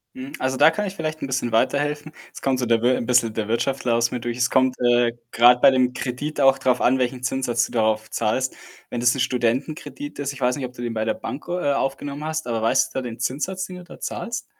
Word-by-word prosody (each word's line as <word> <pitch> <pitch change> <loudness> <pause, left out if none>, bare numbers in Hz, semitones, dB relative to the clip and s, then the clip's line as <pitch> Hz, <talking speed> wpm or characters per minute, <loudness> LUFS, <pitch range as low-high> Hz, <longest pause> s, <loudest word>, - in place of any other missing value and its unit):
Mhm, 260 +2 -8
also, 130 0 -1
da 155 +3 +7
kann 210 - -2
ich 190 - -6
vielleicht 155 -2 -4
'n 140 - -3
bisschen 130 -2 -1
weiterhelfen. 145 +5 0 0.2
Es - - -10
kommt 130 -1 0
so 125 - 0
der 115 -1 +2
Wir 125 +1 +3
'n 120 - -3
bisschen 120 -3 +3
der 110 -2 -3
Wirtschaftler 120 +1 0
aus 120 0 +2
mir 125 - -3
durch. 120 0 -4
Es 125 0 +2
kommt, 130 -1 +2
äh, 120 -1 +3 0.2
grad 125 +1 +6
bei - - +8
dem 125 -1 +2
Kredit 140 +5 -4
auch 135 0 +5
drauf 130 -2 +1
an, 130 +2 +4
welchen 125 0 -2
Zinssatz 120 -2 0
du - - -11
darauf 110 -1 +1
zahlst. 130 +5 -1 0.3
Wenn 120 - -4
das 120 +1 +4
'n - - -4
Studentenkredit 130 - -2
ist 140 0 -2
ich 135 - -12
weiß 125 0 +2
nicht, 135 -3 -4
ob 125 - -9
du 120 - -9
den 120 -1 -3
bei 110 0 -1
der 110 - +1
Bank 140 - -7
o 180 +1 -1
äh, 145 -4 +1
aufgenommen 140 +2 -3
hast, 155 -2 -3
aber 115 -2 -1
weißt 115 - +2
du - - -1
da - - -4
den 120 -2 -7
Zinssatz, 185 +8 -2
den 185 -1 -9
du 180 - -10
da 175 - -13
zahlst? 235 0 -4
130 Hz, 265 wpm, -23 LUFS, 120-145 Hz, 0.3 s, bei